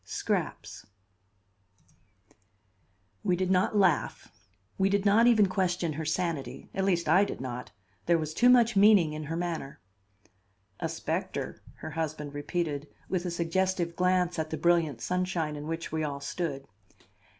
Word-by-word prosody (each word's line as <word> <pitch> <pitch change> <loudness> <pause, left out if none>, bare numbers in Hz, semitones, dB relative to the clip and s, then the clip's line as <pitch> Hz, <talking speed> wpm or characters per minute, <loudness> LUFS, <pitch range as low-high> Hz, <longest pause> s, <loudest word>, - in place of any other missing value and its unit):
SCRAPS - - -3 2.4
We 185 -4 +2
did 185 +1 -1
not 190 +3 +2
laugh; 185 -7 +1 0.5
we 190 0 +3
did 200 0 +1
not 215 +4 +5
even 220 -4 +6
question 180 -3 -1
her 160 +2 -4
sanity; 160 -2 -3
at 195 - -1
least 175 -4 +1
I 180 +6 +5
did 200 - -4
not; 125 -1 -6 0.4
there 170 - +4
was 155 -1 -3
too 245 +8 +4
much 240 -2 +5
meaning 195 -6 +5
in 155 0 -5
her 165 +3 -3
manner. 170 -5 -4 1.0
"A - - -2
specter," - - -4
her - - -8
husband 155 -3 -4
repeated 145 0 -3 0.2
with 185 -1 -1
a - - -1
suggestive 170 0 -1
glance 180 -1 +1
at 155 0 -2
the 160 - -3
brilliant 160 -6 +2
sunshine 180 -4 -1
in 150 +1 -7
which 165 +1 -4
we 160 0 -1
all 140 -2 -3
stood. 140 -1 -4
170 Hz, 150 wpm, -29 LUFS, 155-185 Hz, 2.4 s, even